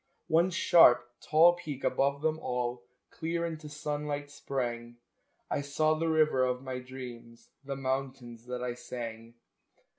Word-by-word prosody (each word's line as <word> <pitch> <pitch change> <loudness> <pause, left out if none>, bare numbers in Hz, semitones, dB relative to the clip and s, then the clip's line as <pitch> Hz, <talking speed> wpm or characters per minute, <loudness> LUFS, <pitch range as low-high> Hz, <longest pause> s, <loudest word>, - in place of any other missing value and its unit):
One 170 +2 +3
sharp, 145 -9 +6
tall 165 +3 +6
peak 150 -6 -7
above 140 +2 +1
them 160 0 +1
all 125 -3 -2 0.3
Clear 170 +1 -2
into 155 -2 -6
sunlight 145 -1 -4
sprang 120 -4 -4 0.5
I - - -1
saw 155 +2 +1
the 165 +1 -1
river 155 -4 +3
of 125 0 -1
my 130 -1 -4
dreams, 125 -2 -10
The 140 0 -4
mountains 130 -3 -4
that 125 0 -4
I 125 -1 -2
sang! 115 -1 -7
135 Hz, 140 wpm, -30 LUFS, 125-155 Hz, 0.5 s, sharp